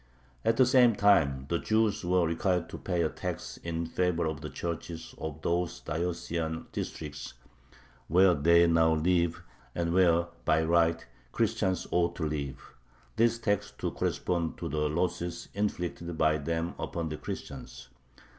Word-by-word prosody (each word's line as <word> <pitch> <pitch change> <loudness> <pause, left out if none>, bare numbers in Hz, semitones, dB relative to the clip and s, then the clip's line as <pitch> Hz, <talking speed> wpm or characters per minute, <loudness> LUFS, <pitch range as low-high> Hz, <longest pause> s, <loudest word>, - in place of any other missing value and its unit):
At 115 - +2
the 130 - +6
same 125 -3 +5
time 75 -11 +3
the 85 +3 0
Jews 110 -1 +1
were 90 0 +2
required 90 +2 0
to - - -7
pay 90 -3 0
a 80 - +1
tax - - -5
in 85 0 -3
favor 85 0 0
of 80 -3 -3
the - - -5
churches 85 -1 -5
of 80 0 -6
those 85 0 0
diocesan 80 0 -3
districts 70 -2 -6 0.7
"where 90 +3 +5
they 85 +3 +5
now 80 -1 +4
live, 85 +1 +1 0.3
and 85 -1 0
where 85 -2 +4 0.2
by 80 +1 +3
right 85 0 +2 0.3
Christians 95 -2 0
ought 85 -1 +1
to 80 - -2
live," 70 -3 -5 0.4
this 115 +1 +3
tax 105 -3 0
to - - -2
correspond 85 -2 -1
to - - -4
"the 75 0 0
losses 85 +1 -2
inflicted 85 -4 -3
by 80 -1 +3
them 80 +3 -2
upon 85 -2 -3
the 75 - -4
Christians." - - -8
85 Hz, 150 wpm, -29 LUFS, 80-90 Hz, 0.7 s, the